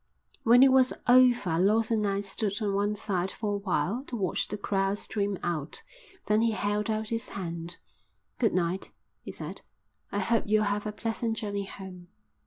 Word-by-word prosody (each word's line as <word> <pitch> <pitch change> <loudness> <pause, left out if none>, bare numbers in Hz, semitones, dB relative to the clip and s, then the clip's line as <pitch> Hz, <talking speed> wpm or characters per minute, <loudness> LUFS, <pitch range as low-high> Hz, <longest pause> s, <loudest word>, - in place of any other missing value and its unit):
When 240 +3 +7
it 270 - +7
was 260 -1 +5
over 245 -9 +5
Lawson 220 +4 +3
and 210 - 0
I 200 0 0
stood 200 +1 -2
on 205 -3 -1
one 205 +1 +1
side 190 -3 -1
for 210 +1 -3
a - - 0
while 195 - -1
to 250 - -6
watch 195 -5 -1
the 210 - -4
crowd 195 0 0
stream 205 -2 -2
out, 160 -4 -3 0.4
then 210 +1 +3
he 230 -1 +2
held 210 +1 -1
out 215 0 -1
his 230 +2 -2
hand. 170 -2 -6 0.6
"Good 225 -6 +2
night," 180 +1 -1 0.3
he - - -7
said. - - -6 0.5
"I - - -2
hope 230 -1 +1
you'll 215 +1 +3
have 205 +1 -1
a - - -2
pleasant 225 +1 -2
journey 205 -3 -3
home." 190 -2 -10
205 Hz, 185 wpm, -28 LUFS, 195-225 Hz, 0.6 s, When